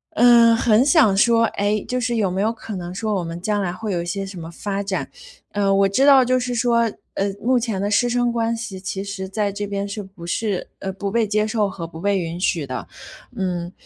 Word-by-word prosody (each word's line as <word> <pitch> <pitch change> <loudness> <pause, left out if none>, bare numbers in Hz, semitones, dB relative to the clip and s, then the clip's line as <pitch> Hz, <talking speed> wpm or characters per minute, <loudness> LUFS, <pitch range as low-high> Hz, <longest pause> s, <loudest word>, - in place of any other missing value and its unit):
呃， 235 -1 +6
很 225 0 +4
想 285 - +5
说， 230 +2 +4
哎， 205 0 -1
就 250 - -1
是 240 -1 -1
有 195 -4 +1
没 190 - -1
有 220 +2 +2
可 220 -1 -8
能 175 0 -6
说 215 0 -2
我 180 - -1
们 165 +1 -6
将 205 +2 0
来 185 -3 -1
会 210 +3 -5
有 170 - -1
一 - - -5
些 195 +3 -3
什 190 -2 -8
么 165 - -7
发 200 +3 -3
展。 195 -1 -3 0.4
呃， 200 -1 +1
我 195 0 +4
知 265 +8 +2
道 275 -2 +7
就 255 +1 +2
是 250 0 -3
说， 235 0 +2 0.3
呃， 195 0 0
目 250 +2 +3
前 220 -5 -2
的 205 - -1
师 240 +4 +3
生 245 0 +1
关 230 0 0
系 220 -5 -6
其 190 +1 -4
实 195 -1 -5
在 205 0 -1
这 205 +1 -4
边 200 0 -3
是 205 +1 -5
不 190 -3 -12
是， 200 +2 -2
呃 195 - -4
不 200 0 -4
被 230 0 +1
接 215 +1 +1
受 215 -2 0
和 180 -3 -6
不 160 -1 -10
被 200 -1 +1
允 170 -1 -4
许 170 -5 0
的。 130 - -5 0.5
嗯， 180 -2 -2
205 Hz, 260 characters per minute, -21 LUFS, 190-230 Hz, 0.5 s, 道